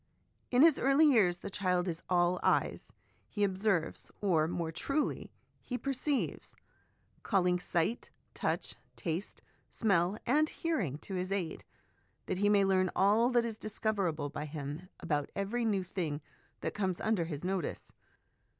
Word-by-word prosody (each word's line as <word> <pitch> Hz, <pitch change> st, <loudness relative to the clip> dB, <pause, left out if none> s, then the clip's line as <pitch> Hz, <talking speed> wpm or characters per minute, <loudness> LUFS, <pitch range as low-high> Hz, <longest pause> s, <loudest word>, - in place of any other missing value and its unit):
In 250 Hz, +3 st, +5 dB
his 325 Hz, -3 st, +6 dB
early 275 Hz, +4 st, +5 dB
years 210 Hz, -12 st, +4 dB
the 185 Hz, -, -7 dB
child 180 Hz, -2 st, 0 dB
is 165 Hz, -2 st, -3 dB
all 180 Hz, 0 st, +3 dB
eyes; -, -, +1 dB, 0.4 s
he 205 Hz, -, -1 dB
observes, 190 Hz, -3 st, 0 dB
or, 165 Hz, -6 st, +2 dB
more 170 Hz, -1 st, -2 dB
truly, 275 Hz, -, -2 dB, 0.3 s
he 250 Hz, -, -4 dB
perceives, 275 Hz, +2 st, -2 dB, 0.7 s
calling 180 Hz, -3 st, +2 dB
sight, 175 Hz, +6 st, -1 dB, 0.2 s
touch, -, -, -2 dB, 0.2 s
taste, 175 Hz, +2 st, -4 dB, 0.3 s
smell, 195 Hz, -2 st, +2 dB
and 305 Hz, +5 st, +3 dB
hearing 225 Hz, -, -2 dB
to 195 Hz, -, -6 dB
his 185 Hz, +1 st, -2 dB
aid, 185 Hz, -5 st, -2 dB, 0.6 s
that 185 Hz, -, -2 dB
he 205 Hz, +1 st, +3 dB
may 200 Hz, -1 st, +5 dB
learn 185 Hz, -1 st, +3 dB
all 210 Hz, +5 st, +4 dB
that 240 Hz, -2 st, +3 dB
is 225 Hz, -2 st, -5 dB
discoverable 195 Hz, -9 st, -1 dB
by 150 Hz, -, -4 dB
him 150 Hz, +3 st, -6 dB
about 150 Hz, -5 st, -1 dB
every 215 Hz, +4 st, -1 dB
new 200 Hz, -4 st, +1 dB
thing 165 Hz, -5 st, -3 dB, 0.4 s
that -, -, -2 dB
comes 190 Hz, -4 st, -1 dB
under 215 Hz, -6 st, +1 dB
his 155 Hz, -2 st, -6 dB
notice. 185 Hz, -3 st, -3 dB
190 Hz, 145 wpm, -32 LUFS, 175-220 Hz, 0.7 s, his